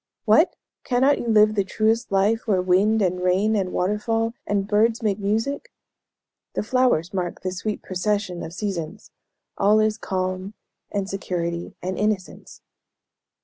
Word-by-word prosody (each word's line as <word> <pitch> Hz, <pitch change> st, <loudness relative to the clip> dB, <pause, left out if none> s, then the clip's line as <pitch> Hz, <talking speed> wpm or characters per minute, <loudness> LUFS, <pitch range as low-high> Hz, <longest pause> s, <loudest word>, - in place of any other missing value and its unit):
"What! -, -, +4 dB, 0.3 s
cannot 265 Hz, +3 st, +2 dB
you -, -, -4 dB
live 215 Hz, -1 st, +5 dB
the 200 Hz, -2 st, +1 dB
truest 220 Hz, +4 st, 0 dB
life 205 Hz, +5 st, +2 dB
where 195 Hz, -4 st, +3 dB
wind, 195 Hz, +4 st, +3 dB
and 180 Hz, -1 st, 0 dB
rain, 190 Hz, +4 st, +2 dB
and 190 Hz, -3 st, -1 dB
water 205 Hz, +4 st, 0 dB
fall, 225 Hz, +1 st, 0 dB
and 200 Hz, -1 st, 0 dB
birds 225 Hz, +3 st, +2 dB
make 210 Hz, -1 st, 0 dB
music? 225 Hz, -, -1 dB, 0.8 s
the -, -, 0 dB
flowers 225 Hz, -7 st, +1 dB
mark 180 Hz, -2 st, -3 dB
the 185 Hz, -, -1 dB
sweet 205 Hz, +3 st, -4 dB
procession 190 Hz, -1 st, -2 dB
of 160 Hz, -, -6 dB
seasons 185 Hz, -1 st, -5 dB, 0.5 s
all 210 Hz, +2 st, +4 dB
is 215 Hz, 0 st, +1 dB
calm, 185 Hz, +2 st, -3 dB, 0.4 s
and 200 Hz, -2 st, -2 dB
security, 175 Hz, -3 st, -3 dB
and 185 Hz, +1 st, -3 dB
innocence." 210 Hz, -3 st, -3 dB
205 Hz, 145 wpm, -23 LUFS, 185-220 Hz, 0.8 s, live